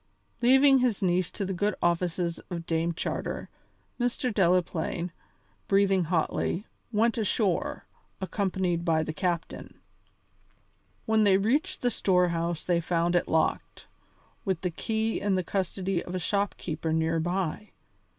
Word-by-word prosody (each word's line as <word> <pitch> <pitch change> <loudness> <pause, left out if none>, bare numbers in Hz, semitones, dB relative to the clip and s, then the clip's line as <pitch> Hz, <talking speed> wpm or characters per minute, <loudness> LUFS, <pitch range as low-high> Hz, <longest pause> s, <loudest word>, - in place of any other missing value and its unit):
Leaving 265 +2 +6
his 235 -5 +1
niece 180 -1 +2
to 200 - -4
the 190 - -2
good 205 +3 0
offices 170 0 0
of 170 -2 -5
Dame 165 0 0
Charter, 165 - -4 0.5
Mr. 245 0 0
Delaplaine, 180 -2 +1 0.6
breathing 195 -2 +3
hotly, 170 +3 -1 0.3
went 230 +2 +2
ashore, 205 -3 0 0.3
accompanied 190 -3 -1
by 160 -2 +2
the 155 - -4
captain. 170 +1 -3 1.3
When 220 -1 +3
they 195 -2 +5
reached 290 - 0
the 245 - +3
storehouse 170 -4 +1
they 175 -1 +1
found 170 +1 +1
it 175 - +2
locked, 160 0 0 0.6
with 190 -5 -1
the 180 - -1
key 220 +5 -1
in 200 -1 +1
the 185 - 0
custody 190 -1 -1
of 180 - -6
a - - +1
shop 200 +3 0
keeper 160 -1 -3
near 160 +1 +1
by. 180 +3 -2
185 Hz, 135 wpm, -28 LUFS, 170-205 Hz, 1.3 s, Leaving